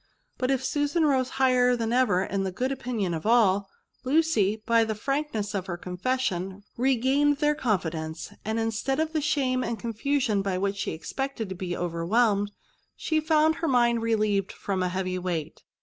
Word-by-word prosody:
But 255 - 0
if 265 -1 +1
Susan 295 +4 +1
rose 260 -3 +2
high 265 -1 +4
€t 250 -1 +3
than 230 0 -1
ever 215 -8 +3
in 195 0 -2
the 190 -1 -2
good 255 +8 -2
opinion 240 -9 -2
of 160 +5 -3
all, 200 -4 +3 0.3
Lucy 255 -8 +2
by 230 0 +4
the 220 -1 -2
frankness 275 -4 -2
of 195 -2 -3
her 175 -2 -3
confession 190 0 -2
regained 270 +3 +2
their 295 +1 +2
confidence; 165 - -2
and, 220 +1 -1
instead 225 +5 -1
of 315 0 -1
the 310 - +1
shame 265 -4 +1
and 235 - -2
confusion 230 0 0
by 195 -2 -1
which 200 +1 -1
she - - -2
expected 230 +6 -4
to 190 - -5
bo 180 -1 -4
overwhelmed, 200 +5 +1 0.4
she 315 -1 0
found 315 0 +3
her 330 - -2
mind 240 -3 +3
relieved 215 -3 +1
from 195 -2 -3
a 180 - +1
heavy 185 0 -2
weight. 175 -4 -4
225 Hz, 180 wpm, -26 LUFS, 195-265 Hz, 0.4 s, high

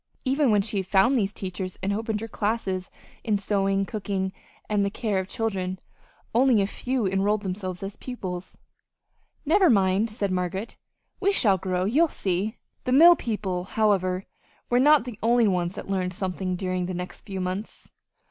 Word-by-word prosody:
Even 270 +1 +2
when 205 -2 +3
she 200 - -2
had 190 -1 -2
found 200 +8 +4
these 200 -5 +1
teachers 185 -2 -5
and 200 +1 +1
opened 220 0 -2
her 225 - -4
classes 205 -4 -2 0.3
in 215 -3 +1
sewing, 195 -1 +1
cooking, 195 -2 -3 0.3
and 205 -1 +1
the 200 - +1
care 205 -1 -1
of 190 - -4
children, 190 -4 -2 0.6
only 245 -1 +4
a 195 - +3
few 245 +3 -2
enrolled 200 +2 +1
themselves 185 -1 -4
as 195 +1 -6
pupils. 185 -8 -6 0.9
"Never 365 +4 +5
mind," 200 0 +3
said 210 -3 -2
Margaret, 185 +4 -2 0.4
"we 400 0 +3
shall 205 - +3
grow. 185 0 -1
You'll 290 +12 +4
see!" 200 - -2 0.3
The 255 - 0
mill 335 +6 +8
people, 195 - -3
however, 190 -3 +1 0.5
were 245 - +4
not 295 -1 +5
the 235 -4 -8
only 235 0 +4
ones 180 -2 0
that - - -7
learned 185 -2 -1
something 185 -1 -2
during 185 -1 -2
the 185 - -4
next 180 +1 -6
few 195 -2 -6
months. 185 +3 -5
200 Hz, 170 wpm, -26 LUFS, 185-225 Hz, 0.9 s, mill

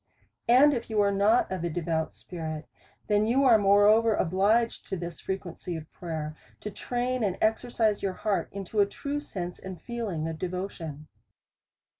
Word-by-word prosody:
And 265 +5 +7
if 235 -3 -3
you 220 -1 0
are 200 0 +3
not 205 +4 +3
of 185 -3 -3
a 170 - 0
devout 160 -1 -1
spirit, 160 -3 -6 0.4
then 210 0 +2
you 260 +4 +3
are 235 -5 +6
moreover 205 +2 +5
obliged 205 +7 +1
to 190 - -2
this 170 0 -6
frequency 180 -2 -5
of 160 -1 -8
prayer, 155 -3 -5 0.3
to 210 - -5
train 245 +3 -2
and 195 -3 0
exercise 220 -1 +1
your 195 -1 -1
heart 205 +1 -1
into 200 +2 -4
a 200 - +5
true 285 +7 -4
sense 180 -11 -6
and 190 -2 -8
feeling 215 -10 -3
of 160 -1 -5
devotion. 175 -5 -5
200 Hz, 165 wpm, -28 LUFS, 175-225 Hz, 0.4 s, And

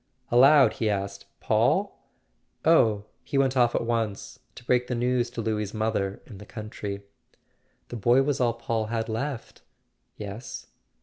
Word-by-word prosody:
Aloud 135 +3 +6
he 110 - +2
asked: 100 -1 -3
"Paul?" - - +1 0.6
"Oh, 110 -11 +4 0.2
he 140 - -3
went 135 -1 +2
off 120 -2 +3
at - - 0
once. 115 -3 -2 0.2
To - - -12
break 125 0 +1
the 125 - -2
news 120 0 +1
to 120 -1 -5
Louis' 105 -1 -2
mother 110 -3 -1
in 105 -6 -12
the 105 - -10
country." 105 -2 -6 0.9
"The 120 - -5
boy 120 +5 +4
was 140 -1 -1
all 120 -2 +2
Paul 115 -3 -2
had 115 0 -2
left." 120 +3 -4 0.6
"Yes." 105 +3 -7
115 Hz, 150 wpm, -26 LUFS, 105-125 Hz, 0.9 s, Aloud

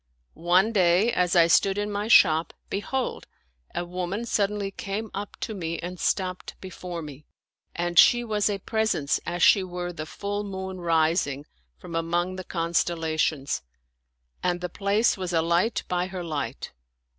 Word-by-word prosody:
One 180 +6 +3
day, 190 +2 +3
as 180 0 +1
I 170 -1 +7
stood 195 +4 +3
in 205 0 -2
my 205 +1 -2
shop, 165 -8 +5 0.2
bdiold, 250 +6 -2 0.5
a 175 - -2
woman 180 +5 -3
suddenly 205 -2 0
came 205 +3 -5
up 205 +1 -6
to 225 - -3
me 170 -4 -3
and 180 +1 -6
stopped 185 -2 -2
before 180 -2 -7
me; 150 0 -11 0.5
and 175 0 +2
she 240 0 +6
was 210 -2 0
a 205 - -1
pres 220 +2 0
ence 140 -1 0
as 175 0 -1
she 195 - +6
were 175 -1 -5
the 155 -2 -6
full 205 +3 -4
moon 190 -2 -6
rising 160 -4 +1 0.3
from 170 - -10
among 170 +2 -1
the 185 - -6
con 170 -1 -3
stellations, 155 - 0 0.8
and 175 -1 0
the 180 0 -4
place 205 +5 +1
was 185 -2 -4
a 165 - +3
light 170 +7 +1
by 180 0 -1
her 185 -2 -6
light. 145 -7 -4
180 Hz, 165 wpm, -26 LUFS, 170-200 Hz, 0.8 s, I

